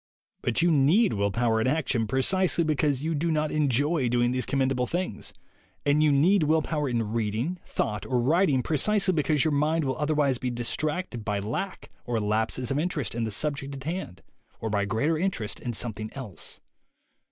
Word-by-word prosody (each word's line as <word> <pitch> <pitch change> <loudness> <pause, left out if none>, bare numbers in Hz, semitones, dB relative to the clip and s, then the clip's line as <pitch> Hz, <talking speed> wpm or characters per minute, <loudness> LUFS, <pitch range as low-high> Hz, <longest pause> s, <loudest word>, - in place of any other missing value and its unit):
But 120 +7 0
you 175 - +4
need 160 +10 +4
will 100 0 0
power 115 +1 +1
in 110 - +1
action 130 -6 0
precisely 170 - +2
because 150 -3 0
you 165 +1 -1
do 160 +3 -1
not 155 -1 0
enjoy 145 -1 +1
doing 120 0 +2
these 130 0 0
commendable 130 -2 0
things, 175 - -3 0.5
and 145 +1 +3
you 155 -1 +4
need 170 +8 +4
will 155 +1 +2
power 150 -3 -2
in 115 -3 -1
reading, 115 - -2
thought 105 -2 -2
or 125 -2 +1
writing 145 0 +2
precisely 190 +5 +2
be 155 - +2
cause 150 -1 +2
your 155 - +1
mind 150 +2 +1
will 130 +2 -2
otherwise 150 -4 +1
be 130 - -2
distracted 125 +3 -2
by 105 -1 -1
lack 115 - -4
or 120 -2 -1
lapses 110 +4 -1
of 135 - +1
interest 155 -5 -2
in 115 0 -2
the - - -2
subject 140 +4 -1
at 135 - -8
hand 165 - -5 0.4
or 110 - -3
by 100 -1 +1
greater 145 +11 0
interest 170 - -2
in 120 - -4
something 110 -2 -3
else. 125 -8 -6
140 Hz, 185 wpm, -26 LUFS, 120-155 Hz, 0.5 s, you